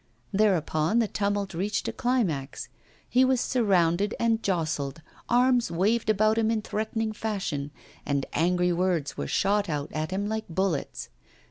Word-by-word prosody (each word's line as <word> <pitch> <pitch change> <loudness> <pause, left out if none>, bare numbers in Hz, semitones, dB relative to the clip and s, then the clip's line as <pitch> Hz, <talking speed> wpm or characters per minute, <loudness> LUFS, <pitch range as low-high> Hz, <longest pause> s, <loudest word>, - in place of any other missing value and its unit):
Thereupon 185 -3 +2
the 230 -2 +3
tumult 200 -1 -1
reached 195 +5 -2
a - - -2
climax. 185 - -1 0.4
He 255 - +4
was 260 -1 +3
surrounded 200 -5 +2
and 230 -1 +2
jostled, 155 -5 -2 0.3
arms 245 0 +3
waved 215 +6 +1
about 215 +1 +3
him 220 -1 +2
in 220 -2 0
threatening 220 +1 -2
fashion, 195 -10 -3 0.3
and 140 -1 -1
angry 180 +2 +2
words 175 -4 0
were 70 - -4
shot 205 - +1
out 145 -1 -3
at 155 0 -2
him 195 +2 -2
like 220 0 -2
bullets. 180 -2 -2
200 Hz, 145 wpm, -27 LUFS, 165-220 Hz, 0.4 s, He